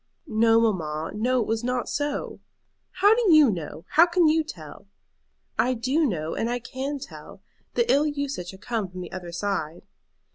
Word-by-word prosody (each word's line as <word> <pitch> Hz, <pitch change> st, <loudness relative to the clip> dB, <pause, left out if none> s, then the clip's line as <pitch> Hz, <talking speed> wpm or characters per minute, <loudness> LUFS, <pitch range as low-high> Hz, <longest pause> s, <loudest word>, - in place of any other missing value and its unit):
"No, 225 Hz, +1 st, +3 dB
mamma; 160 Hz, -8 st, -1 dB
no, 245 Hz, +4 st, +1 dB
it -, -, -1 dB
was 225 Hz, +2 st, -2 dB
not 250 Hz, 0 st, -1 dB
so." 290 Hz, 0 st, -3 dB, 0.5 s
"How 400 Hz, +4 st, +4 dB
do 450 Hz, -5 st, +3 dB
you 305 Hz, -6 st, +7 dB
know? 165 Hz, -2 st, -6 dB
how 335 Hz, +3 st, +6 dB
can 345 Hz, -1 st, +3 dB
you 315 Hz, +1 st, +3 dB
tell?" 310 Hz, -, -11 dB, 0.7 s
"I 255 Hz, +1 st, +2 dB
do 270 Hz, +7 st, +1 dB
know; 160 Hz, -7 st, -3 dB
and 230 Hz, -, -2 dB
I 245 Hz, -, 0 dB
can 265 Hz, +4 st, -5 dB
tell. 280 Hz, -, -11 dB, 0.3 s
The 475 Hz, -, +3 dB
ill 290 Hz, +2 st, +3 dB
usage 280 Hz, -11 st, -3 dB
had 190 Hz, +1 st, -11 dB
come 225 Hz, -3 st, -2 dB
from 185 Hz, 0 st, -8 dB
the 175 Hz, -, -8 dB
other 175 Hz, -2 st, -7 dB
side." 175 Hz, -3 st, -3 dB
240 Hz, 180 wpm, -25 LUFS, 185-290 Hz, 0.7 s, you